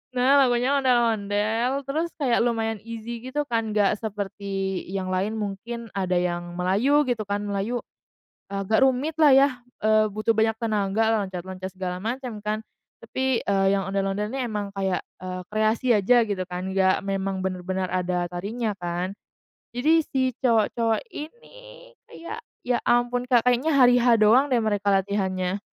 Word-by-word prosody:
Nah, 265 +3 +5
lagunya 250 +1 +2
Ondel-Ondel, 230 +1 +1
terus 315 +5 -1
kayak 255 -7 +2
lumayan 225 -2 0
easy, 230 +1 -7
gitu 270 +4 -2
kan, 225 -3 -1
nggak 205 0 +2
seperti 195 -2 -3
yang 190 -1 -3
lain, 200 +4 -1
mungkin 220 +3 -5
ada 185 -2 -1
yang 175 -1 -2
Melayu 220 +12 +3
gitu 245 -4 -1
kan, 205 +1 -2
Melayu, 205 +4 -2 0.7
eee, 195 0 -2
agak 220 +5 +4
rumit 265 +4 +1
lah 310 -3 +5
ya, 270 +1 +6 0.3
eee, 215 0 +3
butuh 215 +2 0
banyak 220 +1 +2
tenaga, 215 0 +1
loncat-loncat, 185 0 -6
segala 185 -1 -4
macam, 235 -2 -4
kan. 215 +1 -1 0.4
Tapi, 260 -2 -1
eee, 195 -1 +1
yang 195 -1 -1
Ondel-Ondel 195 +1 -1
ini 260 +2 -3
emang 210 -3 -3
kayak, 190 -2 -1 0.2
eee, 185 0 -5
kreasi 215 +4 0
aja 235 +4 +4
gitu 195 -3 -2
kan, 180 +1 -5
nggak 190 0 +2
memang 195 -1 -2
bener-bener 185 0 -2
ada 180 -1 -1
tarinya, 205 +5 -3
kan. 175 +2 -3 0.6
Jadi, 315 +6 +4
si 260 -2 0
cowok-cowok 230 -1 +1
ini, - - -11 0.2
kayak, 335 +7 -8 0.3
ya 245 -1 +1
ampun 245 +1 +2
Kak, 240 -3 +4
kayaknya 250 +5 +2
hari-H 245 -2 +5
doang 225 +6 +5
deh, 255 - +3
mereka 205 -2 -1
latihannya. 190 -1 0
215 Hz, 150 wpm, -25 LUFS, 195-245 Hz, 0.7 s, ya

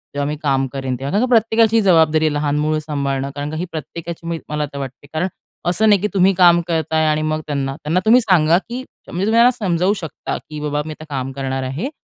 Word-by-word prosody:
जेव्हा 145 0 -1
मी 150 - -2
काम 135 -3 +1
करेन 135 -2 -3
तेव्हा. 135 +3 -5
कारण 210 +5 +2
का - - -6
प्रत्येकाची 225 -1 +4
जबाबदारी 160 -5 +4
आहे 155 - +1
लहान 145 0 0
मूल 155 +1 +1
सांभाळणं 140 -3 -2
कारण 145 0 -4
का - - -5
ही 175 - -2
प्रत्येकाची 165 +2 -7
मी 165 -1 -2
मला 150 0 -1
तर - - -6
वाटते. 135 +1 -8
कारण 160 +4 0 0.4
असं 215 +5 +3
नाही 205 -3 +4
की 210 - +1
तुम्ही 195 0 +4
काम 175 -1 +6
करत 160 -2 -1
आहे 160 0 +3
आणि 155 0 +1
मग 155 0 -1
त्यांना 135 -2 -2
त्यांना 155 +4 -1
तुम्ही 240 +3 +6
सांगा 170 -6 +4
की 235 +6 -6 0.3
म्हणजे 180 +3 -2
तुम्ही 220 +2 +1
त्यांना 235 +2 +6
समजावू 195 -5 0
शकता 160 -5 -5
की, 150 -1 -9
"बाबा 150 0 -1
मी 155 - -6
आता 155 - -9
काम 135 -2 -3
करणार 135 0 -3
आहे, 135 - -3
155 Hz, 240 wpm, -19 LUFS, 145-185 Hz, 0.4 s, काम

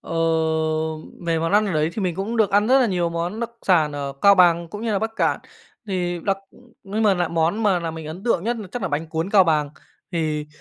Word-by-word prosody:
Ờ, - - -12 1.2
về 165 -1 +1
món 165 +2 -1
ăn 210 +1 +4
ở 195 - -2
đấy 155 0 +1
thì 215 - -4
mình 180 -3 -1
cũng 200 +5 -3
được 215 -3 +3
ăn 205 +1 +3
rất 265 +3 +5
là 250 - +3
nhiều 180 -5 0
món 175 +6 -3
đặc 235 0 -3
sản 160 -6 +3
ở 140 -1 -4
Cao 200 0 +8
Bằng 170 -2 +4
cũng 205 +6 -7
như 230 -2 -1
là 200 - +1
Bắc 220 +2 -2
Kạn. - - +1 0.5
Thì 175 -3 -2
đặc 195 -1 +1 0.5
nhưng 205 +3 -3
m - - +3
lại 175 - +1
món 170 +6 0
mà 195 -4 +3
làm 165 -1 -4
mình 160 -1 -7
ấn 160 +5 -8
tượng 215 -6 +1
nhất 240 +1 0
là 215 -3 -7
chắc 245 - -4
là - - -1
bánh 155 +1 -3
cuốn 160 +4 -3
Cao 195 -3 +6
Bằng. 150 -3 +1 0.4
Thì, 155 -3 -1
180 Hz, 255 wpm, -22 LUFS, 165-205 Hz, 1.2 s, Cao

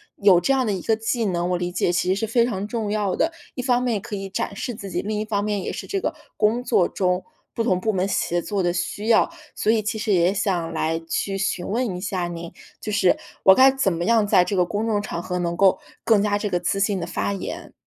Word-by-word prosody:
有 195 -4 +5
这 275 - +1
样 260 -2 +2
的 210 - 0
一 185 - -3
个 225 - +1
技 225 +1 -1
能 175 -2 -1
我 180 - +1
理 175 0 -3
解 180 - +1
其 175 +1 0
实 190 - +3
是 225 - 0
非 230 +2 +2
常 205 -4 -3
重 220 -2 -3
要 205 -3 0
的。 330 - +1 0.2
一 250 - -4
方 245 -1 +1
面 240 -3 0
也 - - -1
可 205 +1 -6
以 195 0 -5
展 195 - -3
示 240 +4 -4
自 200 -2 -8
己， - - -2
另 210 +1 -2
一 215 - -2
方 205 -2 -1
面 210 -2 -1
也 - - -3
是 - - -6
这 395 - -2
个 315 - -2 0.2
工 225 +3 +2
作 180 - +3
中 180 -1 0 0.3
不 230 - -1
同 185 -6 +2
部 220 - +1
门 190 -1 0
协 175 -3 0
作 200 0 -2
的 175 - +2
需 185 +5 -3
要。 220 - +5 0.3
所 - - -1
以 225 -1 +2
其 215 +1 -2
实 220 -1 -1
也 175 +1 +3
想 180 -5 -1
来 160 0 0
去 195 +4 -2
询 185 -2 -2
问 225 -3 -1
一 180 - -7
下 185 -3 -2
您， 170 0 -7 0.3
就 215 - -5
是 190 -3 +3 0.3
我 190 - +9
该 260 +6 +7
怎 265 -8 +1
么 170 0 -2
样 225 -1 +3
在 195 -3 +5
这 205 - -2
个 180 - +4
公 210 +4 -2
众 210 -2 +1
场 170 -4 -4
合 180 0 -3
能 170 -1 -1
够 195 -1 +4 0.3
更 220 -3 +4
加 205 -1 +1
这 205 0 -2
个 175 - 0
自 195 +3 0
信 200 -1 +1
地 - - -2
发 180 +3 -2
言？ 195 - -6
200 Hz, 290 characters per minute, -23 LUFS, 180-220 Hz, 0.3 s, 我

